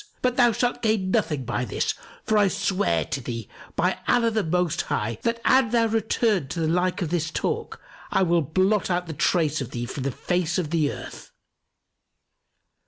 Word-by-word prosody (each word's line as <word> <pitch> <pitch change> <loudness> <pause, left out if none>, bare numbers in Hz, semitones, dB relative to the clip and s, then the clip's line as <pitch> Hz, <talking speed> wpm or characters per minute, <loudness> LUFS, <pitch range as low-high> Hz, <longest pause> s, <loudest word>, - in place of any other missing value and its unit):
But 250 -1 +2
thou 245 -2 +5
shalt 240 +2 -1
gain 215 -4 +1
nothing 160 - 0
by 120 +1 -1
this; 120 - -1 0.3
for 220 - 0
I 205 -1 +5
swear 180 - 0
to 135 +1 -4
thee, 115 -3 -5 0.3
by - - +1
Allah 235 -2 +3
the 220 -1 0
Most 175 0 0
High, 110 +1 -2
that 230 0 0
an 260 -3 +5
thou 230 0 +3
return 220 - +1
to 170 - -5
the 160 - +1
like 180 +3 +1
of 165 - -4
this 160 -3 0
talk, - - -3 0.3
I - - +2
will 170 -1 +3
blot 185 +8 +1
out 180 0 0
the 165 - -6
trace 155 0 +1
of 130 - -4
thee 120 -1 -4
from 135 +3 -6
the 135 - 0
face 175 +5 -1
of 170 -3 -2
earth! 155 -4 -2
180 Hz, 185 wpm, -25 LUFS, 150-215 Hz, 0.3 s, thou